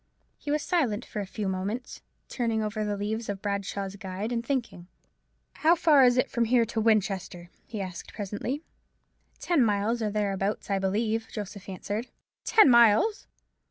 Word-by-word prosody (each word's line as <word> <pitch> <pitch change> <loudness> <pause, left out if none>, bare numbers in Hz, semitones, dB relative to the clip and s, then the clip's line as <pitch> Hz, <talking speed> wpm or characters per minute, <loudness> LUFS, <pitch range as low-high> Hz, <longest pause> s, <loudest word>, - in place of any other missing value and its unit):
He 290 - -7
was 300 0 +1
silent 250 - 0
for 210 - -6
a 200 - -4
few 205 +1 -4
moments, 195 +6 -4 0.3
turning 230 -3 -1
over 215 0 -2
the 205 -1 -2
leaves 215 +2 -3
of 200 -1 -3
Bradshaw's 200 -1 -3
Guide, 195 +3 -5
and 235 -1 -1
thinking. 235 -9 -3 0.7
"How 325 +2 +4
far 305 -5 +5
is 245 0 +5
it 255 - +3
from 235 -1 +1
here 235 0 +3
to 225 0 -2
Winchester?" 195 -5 0 0.2
he 215 -2 -5
asked 185 -2 -7
presently. 215 - -4 0.8
"Ten 335 -7 +2
miles, 215 +2 +1
or 215 - 0
thereabouts, 200 -1 -2
I 195 - +2
believe," 220 +4 0
Joseph 205 -2 -7
answered. 205 +5 -4 0.4
"Ten 435 - +6
miles! 235 - +5
215 Hz, 160 wpm, -27 LUFS, 200-240 Hz, 0.8 s, Ten